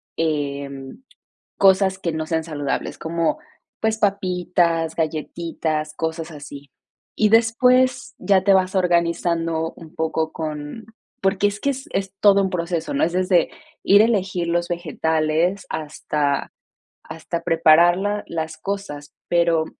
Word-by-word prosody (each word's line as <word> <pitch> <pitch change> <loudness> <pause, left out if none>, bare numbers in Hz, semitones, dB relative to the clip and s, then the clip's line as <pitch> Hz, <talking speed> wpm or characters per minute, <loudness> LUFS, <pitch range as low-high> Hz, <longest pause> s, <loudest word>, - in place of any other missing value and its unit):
em, 140 - -3 0.5
cosas 190 -1 +4
que 170 - -1
no 155 0 -3
sean 160 0 -1
saludables, 145 -4 -4
como, 165 0 -1 0.4
pues, 220 0 0
papitas, 180 -5 0
galletitas, 155 -1 -3
cosas 160 +1 -4
así. 145 -2 -10 0.5
Y 215 - +3
después 250 +3 +3
ya 195 -2 +3
te 195 +1 +4
vas 185 0 +2
organizando 170 -2 0
un 165 -2 -13
poco 160 0 -1
con 155 +6 -6 0.4
porque 195 +1 +2
es 205 0 -6
que 280 - +1
es 270 0 -6
es 195 0 -2
todo 200 -1 +5
un 190 - -1
proceso, 170 -2 -2
¿no? 140 - +2
Es 170 - -1
desde 180 -2 +2 0.3
ir 200 +1 +6
elegir 190 -6 0
los 170 0 0
vegetales 165 +1 0
hasta 150 -2 -2 0.5
hasta 165 +1 -5
prepararla 175 +5 +4
las 160 -1 -4
cosas, 160 -6 -6
pero 170 -2 +2
170 Hz, 125 wpm, -22 LUFS, 160-195 Hz, 0.5 s, ir